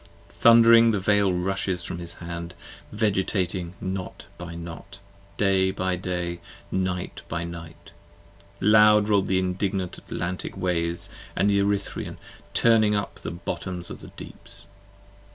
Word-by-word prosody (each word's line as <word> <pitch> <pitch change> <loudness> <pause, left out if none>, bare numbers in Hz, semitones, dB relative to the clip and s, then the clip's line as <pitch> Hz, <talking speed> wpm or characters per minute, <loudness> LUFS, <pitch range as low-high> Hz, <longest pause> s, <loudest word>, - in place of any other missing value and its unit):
26 - - -23
Thund'ring 115 0 +8
the 105 - 0
Veil 100 0 +3
rushes 90 0 -1
from 85 - -4
his 85 -1 -6
hand, 85 0 -7 0.4
Vegetating 95 -4 -1
Knot 95 0 -5
by 85 -1 -8
Knot, 85 +4 -9 0.4
Day 95 -2 +3
by 95 -1 -1
Day, 90 -1 -3 0.3
Night 95 -1 -2
by 85 +1 -2
Night: 85 -1 -9 0.7
loud 105 0 +6
roll 100 -2 +4
the 95 0 0
indignant 95 0 -1
Atlantic 90 +1 -4
63 - - -7
Waves 85 -1 0 0.2
& - - -19
the 100 +1 +3
Erythrean, 100 0 -1 0.4
turning 110 -3 +4
up 100 - -3
the - - -5
bottoms 90 0 -5
of - - -8
the - - -10
Deeps. - - -10
95 Hz, 135 wpm, -25 LUFS, 85-100 Hz, 0.7 s, Thund'ring